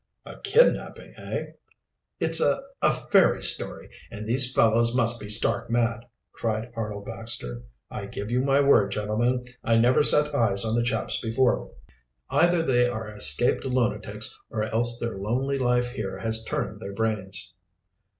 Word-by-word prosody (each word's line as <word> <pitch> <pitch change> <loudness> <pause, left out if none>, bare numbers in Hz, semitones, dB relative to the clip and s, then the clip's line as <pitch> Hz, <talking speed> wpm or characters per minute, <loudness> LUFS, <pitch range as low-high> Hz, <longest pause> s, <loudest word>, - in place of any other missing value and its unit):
"A - - -11
kidnapping, 485 +2 +1
eh?" - - -4 0.8
"It's - - +2
a - - +1 0.2
a - - +4
fairy - - +2
story, - - +1 0.2
and 105 -1 -8
these 125 +3 +2
fellows 115 0 +3
must 120 -1 +2
be 105 - -8
stark 110 +2 +1
mad!" 115 -1 0 0.3
cried 115 +1 -3
Arnold 105 -3 -5
Baxter. 110 - -5 0.3
"I - - -6
give 105 +3 -6
you 125 +1 +2
my 135 +1 +3
word, 110 -8 +4
gentlemen, 115 +5 -1 0.2
I 115 0 +2
never 125 +5 +4
set 150 0 +3
eyes 115 -6 +1
on 110 - -1
the 120 - +2
chaps 120 - -1
before. 120 +2 +1 0.6
Either 175 -1 +3
they 125 -4 +3
are 110 -3 -5
escaped 105 +2 +1
lunatics 125 -3 -2
or 110 -1 -2
else 120 +2 0
their 115 -5 -4
lonely 130 +7 -1
life 125 -1 +1
here 110 -6 -5
has 110 0 -1
turned - - -3
their 100 - -7
brains." 95 -4 -3
115 Hz, 155 wpm, -25 LUFS, 105-125 Hz, 0.8 s, a